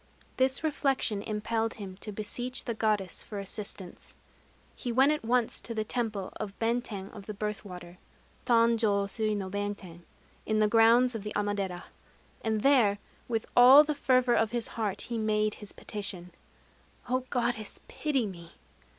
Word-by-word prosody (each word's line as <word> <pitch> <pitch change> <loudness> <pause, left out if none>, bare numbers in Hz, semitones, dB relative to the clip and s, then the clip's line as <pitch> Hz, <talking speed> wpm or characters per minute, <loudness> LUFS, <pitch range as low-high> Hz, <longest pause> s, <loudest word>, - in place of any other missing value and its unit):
This 260 +3 +2
reflection 275 -8 0
impelled 220 +2 -2
him 195 -4 -7
to 210 - -7
beseech 240 +5 -2
the 235 - -1
Goddess 210 -4 0
for 210 - -8
assistance. 195 -2 -5 0.6
He 245 - -4
went 265 +5 +5
at 300 -4 -1
once 240 0 +1
to 230 - -4
the 215 - 0
temple 215 -4 -3
of 200 -2 -6
Benten 225 -4 -2
of 200 -3 -11
the 210 - -5
Birth 210 0 -3
Water 180 -2 -10 0.5
(Tanjô 230 -4 +3
sui 215 +1 -1
no 195 -2 -3
Benten) 200 -3 -5 0.4
in 215 - 0
the 215 0 +4
grounds 230 +3 +5
of 225 - -4
the 210 +1 -5
Amadera; 200 -3 -1 0.6
and 220 -1 0
there, 240 -7 +4 0.3
with 225 -2 -1
all 255 +4 +10
the 305 0 -1
fervor 255 -3 +3
of 225 -2 +3
his 235 0 -3
heart, 210 -3 -2
he 235 -2 -3
made 215 -1 +1
his 210 - -6
petition: 185 -4 -5 0.8
"O 255 +1 +1
Goddess, 235 -4 -2
pity 280 -6 -1
me! 170 -4 -9
215 Hz, 160 wpm, -29 LUFS, 200-240 Hz, 0.8 s, all